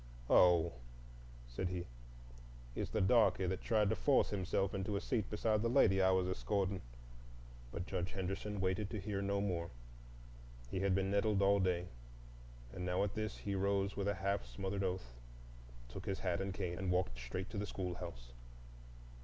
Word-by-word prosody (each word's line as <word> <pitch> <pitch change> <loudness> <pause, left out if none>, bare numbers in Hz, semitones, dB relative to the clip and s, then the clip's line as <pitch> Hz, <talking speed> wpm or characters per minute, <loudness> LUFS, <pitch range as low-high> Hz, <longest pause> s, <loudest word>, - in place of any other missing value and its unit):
"Oh," 85 -2 +6 0.8
said - - -3
he, 90 -1 -3 0.9
"it's - - -3
the 110 - 0
darky 100 -1 +4
that 90 +1 -1
tried 110 -3 +2
to - - +2
force 140 +2 +3
himself 95 0 0
into 100 +1 -2
a - - +1
seat 115 -1 -1
beside 105 0 +1
the 115 - +1
lady 105 -7 +5
I 95 - +5
was 95 -1 +3
escorting—" 95 0 -1 0.9
But 85 - -4
Judge 90 +1 -3
Henderson 95 +2 -3
waited 95 +2 0
to 110 - -3
hear 100 0 -2
no 100 0 0
more. 85 -4 -1 1.0
He 95 - -1
had 95 -1 +2
been 95 0 +1
nettled 100 0 +2
all 100 +1 +5
day, 90 -2 +1 0.9
and 90 - -5
now 90 +1 +1
at 100 -1 -1
this 110 -1 -3
he 100 - -3
rose 100 0 +1
with 100 0 -1
a 100 - +1
half 100 +1 -1
smothered 95 0 -3
oath, 90 -10 -3 0.7
took 95 - -8
his 95 -2 -2
hat 90 -1 0
and 95 0 -2
cane, 90 -3 -3
and 95 -1 -2
walked 90 -10 0
straight 75 +11 -5
to 100 - -3
the 105 - -2
schoolhouse. 85 -11 -5
95 Hz, 175 wpm, -36 LUFS, 90-100 Hz, 1.0 s, Oh